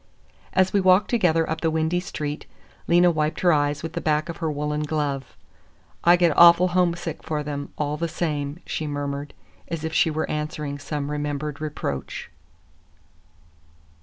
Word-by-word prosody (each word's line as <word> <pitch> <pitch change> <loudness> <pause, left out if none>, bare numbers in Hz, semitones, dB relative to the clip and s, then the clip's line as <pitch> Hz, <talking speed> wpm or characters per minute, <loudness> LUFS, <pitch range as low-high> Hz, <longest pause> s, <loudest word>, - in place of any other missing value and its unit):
As 185 0 +3
we 200 - +3
walked 185 +2 +4
together 170 -8 +2
up 160 0 -3
the 165 - +2
windy 160 +2 0
street, 150 -4 -5 0.4
Lena 175 +1 +5
wiped 155 -1 -1
her 175 -2 +5
eyes 145 0 0
with 165 - -5
the - - -3
back 155 +1 0
of 170 - -5
her 165 -2 -2
woolen 150 +1 -2
glove. 145 -4 -3 0.7
"I 175 +1 +7
get 175 -3 +3
awful 170 +1 +7
homesick 175 -2 0
for 150 -1 -3
them, 145 -1 -5
all 150 0 -1
the 170 +2 -1
same," 150 -2 -3
she 155 - -3
murmured, 145 0 -4 0.3
as 165 -2 -4
if 160 0 -3
she 160 - +3
were 155 0 -2
answering 150 -1 -4
some 145 0 -4
remembered 150 0 -3
reproach. 145 - -4
155 Hz, 165 wpm, -24 LUFS, 145-170 Hz, 0.7 s, I